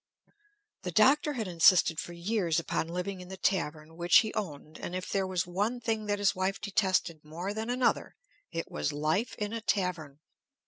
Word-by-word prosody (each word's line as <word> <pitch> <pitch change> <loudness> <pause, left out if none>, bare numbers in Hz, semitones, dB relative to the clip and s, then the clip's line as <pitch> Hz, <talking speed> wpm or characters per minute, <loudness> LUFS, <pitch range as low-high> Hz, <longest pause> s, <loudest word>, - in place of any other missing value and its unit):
The 185 - -4
Doctor 275 - +4
had 225 -6 -3
insisted 170 -1 +5
for 175 - -5
years 170 -2 0
upon 160 - -2
living 180 +2 -4
in 180 - -10
the 190 +1 -8
tavern, 160 -4 -1
which 175 +1 +5
he 220 -2 -4
owned, 155 -7 -5
and 175 - -5
if 185 0 -4
there 195 -1 0
was 185 -2 -1
one 205 +7 -1
thing 225 -2 -2
that 205 0 +1
his 200 -1 +2
wife 190 +1 -1
detested 190 -5 0
more 170 +6 -5
than 220 +2 -4
another, 250 +1 +1 0.4
it 165 -1 -4
was 75 0 -1
life 155 +10 0
in 210 +1 -3
a 230 - -3
tavern. 180 -9 -1
185 Hz, 185 wpm, -30 LUFS, 165-210 Hz, 0.4 s, insisted